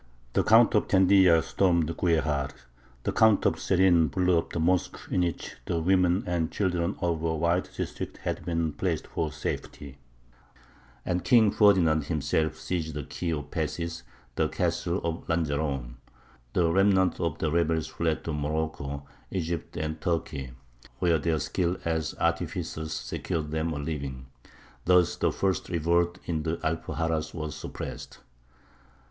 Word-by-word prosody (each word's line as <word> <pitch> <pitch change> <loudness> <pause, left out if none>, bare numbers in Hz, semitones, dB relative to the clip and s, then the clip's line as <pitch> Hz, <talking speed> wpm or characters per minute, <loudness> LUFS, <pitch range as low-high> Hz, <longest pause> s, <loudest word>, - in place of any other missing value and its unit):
The - - +3
Count - - +6
of - - +2
Tendilla 95 -3 +5
stormed 85 -4 +1
Guejar; 80 -6 +1 0.5
the - - 0
Count 110 -2 +4
of - - +3
Serin 90 -3 +4
"blew 90 +5 +2
up - - -6
the - - -2
mosque 90 +2 +1
in 90 - +2
which 85 -2 -3
the 85 - -1
women 90 +2 +3
and 85 -2 -1
children 90 -2 0
of 85 -3 0
a 80 0 0
wide 85 +3 +1
district - - -4
had - - -4
been 85 -2 -1
placed 85 -3 -2
for 80 -2 -3
safety," 70 0 -6 1.1
and 90 -1 -1
King 110 +3 +5
Ferdinand 85 -8 +4
himself 80 0 0
seized 80 -2 -3
the 75 - -3
key 85 - -4
of 75 -2 -2
the 75 - -19
passes, 85 +2 -3 0.4
the - - +3
castle - - -1
of 85 0 -3
Lanjaron. 70 -6 -1 0.6
The 85 -2 +2
remnant 95 0 +3
of 85 -1 -1
the 80 - -1
rebels 80 -1 +1
fled 80 -2 -2
to 80 - -3
Morocco, 75 -2 -3 0.2
Egypt, 85 -2 -3
and 80 0 -3
Turkey, 75 -7 -2 0.4
where 85 -3 +2
their 80 +1 +1
skill 85 +4 -1
as 80 -1 -1
artificers 80 0 -2
secured 80 -1 -3
them 80 +1 -1
a 75 - -3
living. 70 -3 -4 0.6
Thus 90 -1 +4
the - - +1
first 95 -4 -1
revolt 85 +1 +1
in 80 -3 -1
the 80 +1 -2
Alpuxarras 80 0 -2
was 75 -2 -4
suppressed. 75 - -7
80 Hz, 150 wpm, -27 LUFS, 80-90 Hz, 1.1 s, Count